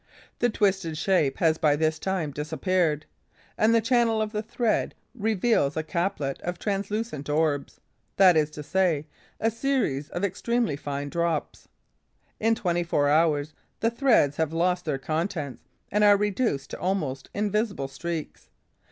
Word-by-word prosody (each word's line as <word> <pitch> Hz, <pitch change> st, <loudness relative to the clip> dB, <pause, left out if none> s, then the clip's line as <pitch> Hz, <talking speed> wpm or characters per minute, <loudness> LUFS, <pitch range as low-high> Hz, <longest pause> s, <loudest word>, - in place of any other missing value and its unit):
The 245 Hz, -, +3 dB
twisted 190 Hz, -7 st, 0 dB
shape 160 Hz, -6 st, +1 dB
has 160 Hz, -2 st, +2 dB
by 150 Hz, -2 st, +3 dB
this 155 Hz, +1 st, 0 dB
time 185 Hz, -6 st, -2 dB
disappeared; 155 Hz, +1 st, 0 dB, 0.5 s
and 215 Hz, +1 st, +3 dB
the 230 Hz, -, +4 dB
channel 230 Hz, -1 st, +2 dB
of 215 Hz, -1 st, -1 dB
the 210 Hz, -1 st, -2 dB
thread 225 Hz, +1 st, -1 dB, 0.2 s
reveals 220 Hz, -, +1 dB
a 160 Hz, -, 0 dB
chaplet 170 Hz, -4 st, -2 dB
of 175 Hz, 0 st, -4 dB
translucent 200 Hz, -6 st, -3 dB
orbs, 150 Hz, -2 st, 0 dB, 0.4 s
that 185 Hz, -3 st, +7 dB
is 155 Hz, -1 st, +3 dB
to 150 Hz, 0 st, -8 dB
say, 165 Hz, -2 st, +1 dB, 0.3 s
a 225 Hz, -, +1 dB
series 230 Hz, -, -1 dB
of 175 Hz, -, -4 dB
extremely 225 Hz, 0 st, 0 dB
fine 145 Hz, 0 st, -4 dB
drops. 170 Hz, 0 st, -2 dB, 0.7 s
In 225 Hz, +1 st, +3 dB
twenty 175 Hz, -4 st, 0 dB
four 145 Hz, -4 st, +1 dB
hours, 155 Hz, -1 st, +2 dB, 0.3 s
the 230 Hz, -, +1 dB
threads 235 Hz, -, +3 dB
have 160 Hz, -1 st, 0 dB
lost 180 Hz, +2 st, +1 dB
their 150 Hz, -4 st, -1 dB
contents 155 Hz, -, -3 dB, 0.3 s
and 210 Hz, +1 st, +2 dB
are 205 Hz, -1 st, +7 dB
reduced 205 Hz, -, -1 dB
to -, -, -6 dB
almost 155 Hz, -8 st, -2 dB
invisible 205 Hz, -7 st, -1 dB
streaks. 160 Hz, +3 st, -6 dB
175 Hz, 150 wpm, -26 LUFS, 150-210 Hz, 0.7 s, that